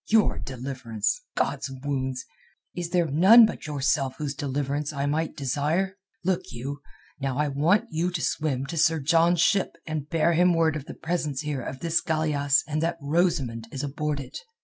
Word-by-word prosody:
Your 220 Hz, -2 st, +3 dB
deliverance! 130 Hz, -, -3 dB
God's -, -, -1 dB
wounds! 130 Hz, -1 st, -3 dB, 0.5 s
Is 175 Hz, -1 st, -3 dB
there 175 Hz, -1 st, +2 dB
none 190 Hz, -, +7 dB
but 215 Hz, -, -5 dB
yourself 135 Hz, -2 st, 0 dB
whose 145 Hz, -2 st, -3 dB
deliverance 145 Hz, +1 st, -2 dB
I 140 Hz, -1 st, -2 dB
might 155 Hz, +3 st, -1 dB
desire? 150 Hz, +8 st, 0 dB, 0.3 s
Look 185 Hz, 0 st, +1 dB
you, 135 Hz, +4 st, -6 dB, 0.4 s
now 135 Hz, -1 st, -2 dB
I 150 Hz, 0 st, +1 dB
want 155 Hz, +9 st, +2 dB
you 165 Hz, +3 st, 0 dB
to 180 Hz, -2 st, -3 dB
swim 140 Hz, -4 st, -1 dB
to 165 Hz, +4 st, -6 dB
Sir 160 Hz, +1 st, +3 dB
John's 165 Hz, +3 st, +3 dB
ship 195 Hz, -2 st, +2 dB
and 155 Hz, -2 st, -4 dB
bear 165 Hz, +1 st, +2 dB
him 175 Hz, +1 st, +4 dB
word 160 Hz, -2 st, +2 dB
of 145 Hz, -3 st, -5 dB
the -, -, -9 dB
presence 160 Hz, -5 st, -2 dB
here 150 Hz, -3 st, -3 dB
of 130 Hz, +2 st, -7 dB
this 165 Hz, 0 st, +1 dB
galeasse 150 Hz, -3 st, +1 dB
and 155 Hz, 0 st, -1 dB
that 170 Hz, +1 st, 0 dB
Rosamund 140 Hz, -7 st, 0 dB
is 135 Hz, +1 st, -4 dB
aboard 145 Hz, +1 st, -2 dB
it. 140 Hz, -, -7 dB
150 Hz, 175 wpm, -26 LUFS, 140-165 Hz, 0.5 s, none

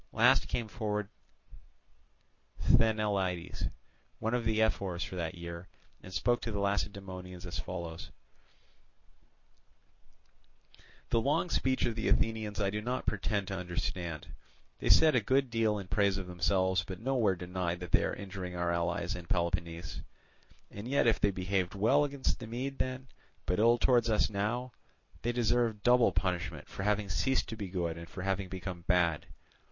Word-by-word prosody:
Last -, -, +5 dB
came 115 Hz, -2 st, -2 dB
forward 105 Hz, -2 st, -2 dB, 1.5 s
Sthenelaidas, 100 Hz, -6 st, +1 dB, 0.5 s
one 110 Hz, +1 st, -2 dB
of 120 Hz, -2 st, 0 dB
the 110 Hz, -1 st, +1 dB
ephors 100 Hz, -5 st, +1 dB
for -, -, -6 dB
that 85 Hz, 0 st, -3 dB
year, 85 Hz, +1 st, -7 dB, 0.3 s
and 95 Hz, -, -11 dB
spoke 120 Hz, +5 st, +1 dB
to 115 Hz, -, -3 dB
the 105 Hz, -, -3 dB
Lacedaemonians 95 Hz, -2 st, -3 dB
as 85 Hz, -2 st, -4 dB
follows: 85 Hz, 0 st, -5 dB, 3.0 s
"The 115 Hz, -, +3 dB
long 145 Hz, +7 st, +1 dB
speech 130 Hz, 0 st, +1 dB
of 120 Hz, -, 0 dB
the 110 Hz, 0 st, -2 dB
Athenians 110 Hz, -2 st, +1 dB
I 100 Hz, -1 st, +1 dB
do 105 Hz, +1 st, -2 dB
not 125 Hz, +3 st, -2 dB
pretend 100 Hz, -1 st, 0 dB
to 95 Hz, -, -2 dB
understand. 85 Hz, -3 st, -3 dB, 0.5 s
They -, -, -1 dB
said 160 Hz, -1 st, +7 dB
a 125 Hz, -, +4 dB
good 130 Hz, +3 st, +2 dB
deal 110 Hz, -2 st, +2 dB
in 100 Hz, -2 st, -6 dB
praise 100 Hz, -2 st, +2 dB
of 95 Hz, -, -4 dB
themselves, 95 Hz, +1 st, +1 dB
but 95 Hz, +1 st, -7 dB
nowhere 115 Hz, -5 st, +2 dB
denied 90 Hz, -1 st, -3 dB
that 90 Hz, -, -6 dB
they -, -, +4 dB
are -, -, -1 dB
injuring 95 Hz, -2 st, -6 dB
our 85 Hz, 0 st, 0 dB
allies 85 Hz, 0 st, -1 dB
and 85 Hz, -2 st, -8 dB
Peloponnese. 85 Hz, -1 st, -2 dB, 0.7 s
And 105 Hz, +3 st, -7 dB
yet 140 Hz, +2 st, +2 dB
if 115 Hz, -, +4 dB
they 105 Hz, -, +3 dB
behaved 95 Hz, -1 st, -1 dB
well 115 Hz, +9 st, +4 dB
against 140 Hz, -2 st, -1 dB
the 120 Hz, -, -7 dB
Mede 130 Hz, +4 st, -4 dB
then, 130 Hz, +1 st, -2 dB, 0.4 s
but 90 Hz, -, 0 dB
ill 115 Hz, +2 st, +5 dB
towards 120 Hz, -1 st, +3 dB
us 110 Hz, 0 st, +2 dB
now, 115 Hz, +5 st, -1 dB, 0.5 s
they 120 Hz, -, 0 dB
deserve 120 Hz, -3 st, +1 dB
double 125 Hz, -1 st, +5 dB
punishment 85 Hz, -5 st, -2 dB
for -, -, -7 dB
having 105 Hz, 0 st, +1 dB
ceased 130 Hz, +9 st, +1 dB
to 110 Hz, -, -4 dB
be 105 Hz, -3 st, -5 dB
good 85 Hz, -3 st, -2 dB
and 85 Hz, -, -9 dB
for 90 Hz, -, -6 dB
having 95 Hz, -1 st, -1 dB
become 95 Hz, -1 st, -5 dB
bad. 85 Hz, -4 st, +2 dB
100 Hz, 160 wpm, -32 LUFS, 90-115 Hz, 3.0 s, said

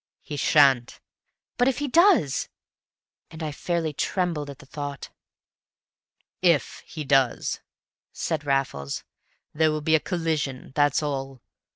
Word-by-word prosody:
"He 150 Hz, -, -6 dB
sha'n't." 135 Hz, -5 st, +4 dB, 0.6 s
"But 245 Hz, -, +4 dB
if 270 Hz, -, +1 dB
he 290 Hz, -, -2 dB
does!" 330 Hz, -, +4 dB, 0.8 s
And 160 Hz, 0 st, -8 dB
I 155 Hz, -, -2 dB
fairly 165 Hz, +1 st, -2 dB
trembled 165 Hz, -2 st, -1 dB
at 140 Hz, -, -8 dB
the 145 Hz, -, -15 dB
thought. 145 Hz, 0 st, -6 dB, 1.3 s
"If 170 Hz, -5 st, +2 dB
he 155 Hz, -, -6 dB
does," 135 Hz, -3 st, +2 dB, 0.5 s
said 155 Hz, -2 st, -2 dB
Raffles, 135 Hz, -, -1 dB, 0.5 s
"there 155 Hz, +1 st, +3 dB
will 155 Hz, 0 st, -1 dB
be 160 Hz, +2 st, +1 dB
a 160 Hz, -, +6 dB
collision, 155 Hz, -8 st, -2 dB
that's 145 Hz, +1 st, +2 dB
all. 135 Hz, -3 st, -4 dB
150 Hz, 130 wpm, -25 LUFS, 135-165 Hz, 1.3 s, a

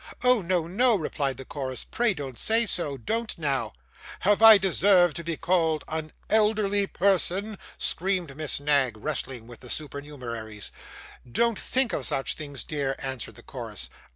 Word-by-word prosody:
'Oh 250 Hz, -3 st, +4 dB
no, 175 Hz, -2 st, 0 dB
no,' 230 Hz, +7 st, +3 dB
replied 145 Hz, -6 st, -2 dB
the 130 Hz, -, -9 dB
chorus, 130 Hz, -2 st, -5 dB
'pray 235 Hz, -4 st, 0 dB
don't 135 Hz, -5 st, -6 dB
say 225 Hz, +1 st, +3 dB
so; 155 Hz, -9 st, 0 dB
don't 225 Hz, -, -3 dB
now!' 135 Hz, -8 st, -1 dB, 0.5 s
'Have 205 Hz, +2 st, +3 dB
I 225 Hz, -1 st, +10 dB
deserved 185 Hz, -2 st, +4 dB
to 170 Hz, -, -4 dB
be 165 Hz, -1 st, -3 dB
called 165 Hz, -4 st, +1 dB
an 155 Hz, -1 st, -4 dB, 0.2 s
elderly 210 Hz, -2 st, +2 dB
person?' 195 Hz, +2 st, +1 dB, 0.2 s
screamed 180 Hz, -5 st, -1 dB
Miss 155 Hz, -1 st, +1 dB
Knag, 140 Hz, -6 st, +2 dB
wrestling 130 Hz, -2 st, -4 dB
with 120 Hz, -1 st, -13 dB
the 125 Hz, -, -12 dB
supernumeraries. 125 Hz, -8 st, -6 dB, 0.6 s
'Don't 235 Hz, -, +1 dB
think 260 Hz, -2 st, +1 dB
of 135 Hz, -, -1 dB
such 135 Hz, -, 0 dB
things, 145 Hz, -3 st, -6 dB
dear,' 140 Hz, -3 st, -2 dB
answered 130 Hz, -3 st, -5 dB
the -, -, -14 dB
chorus. -, -, -8 dB
160 Hz, 155 wpm, -26 LUFS, 135-200 Hz, 0.6 s, I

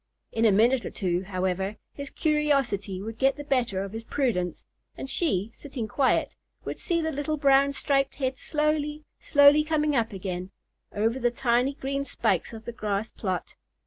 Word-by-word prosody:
In 225 Hz, 0 st, +1 dB
a 220 Hz, -, +6 dB
minute 235 Hz, +5 st, +4 dB
or -, -, -4 dB
two, 180 Hz, -3 st, -1 dB
however, 190 Hz, +1 st, -1 dB, 0.2 s
his 280 Hz, -1 st, -7 dB
curiosity 275 Hz, -11 st, 0 dB
would 225 Hz, +1 st, -7 dB
get 270 Hz, 0 st, +3 dB
the 290 Hz, -, -7 dB
better 240 Hz, -9 st, 0 dB
of 195 Hz, +1 st, -7 dB
his 225 Hz, 0 st, -5 dB
prudence; 225 Hz, -10 st, -1 dB, 0.3 s
and -, -, -5 dB
she, 230 Hz, -, 0 dB
sitting 265 Hz, -6 st, -6 dB
quiet, 265 Hz, +5 st, +1 dB, 0.3 s
would -, -, -5 dB
see 335 Hz, -2 st, 0 dB
the 320 Hz, -, -1 dB
little 305 Hz, +2 st, -2 dB
brown 275 Hz, 0 st, +4 dB
striped 275 Hz, -1 st, +1 dB
head 265 Hz, -2 st, -1 dB
slowly, 300 Hz, 0 st, -1 dB, 0.2 s
slowly 285 Hz, +1 st, +6 dB
coming 305 Hz, -1 st, +1 dB
up 230 Hz, -3 st, +1 dB
again, 185 Hz, -2 st, -5 dB, 0.4 s
over 225 Hz, +5 st, 0 dB
the 240 Hz, -1 st, +2 dB
tiny 245 Hz, +2 st, +1 dB
green 275 Hz, 0 st, -2 dB
spikes -, -, 0 dB
of 225 Hz, -1 st, -10 dB
the -, -, -4 dB
grass 210 Hz, -1 st, -2 dB
plot. 185 Hz, -4 st, -3 dB
255 Hz, 175 wpm, -27 LUFS, 205-285 Hz, 0.4 s, a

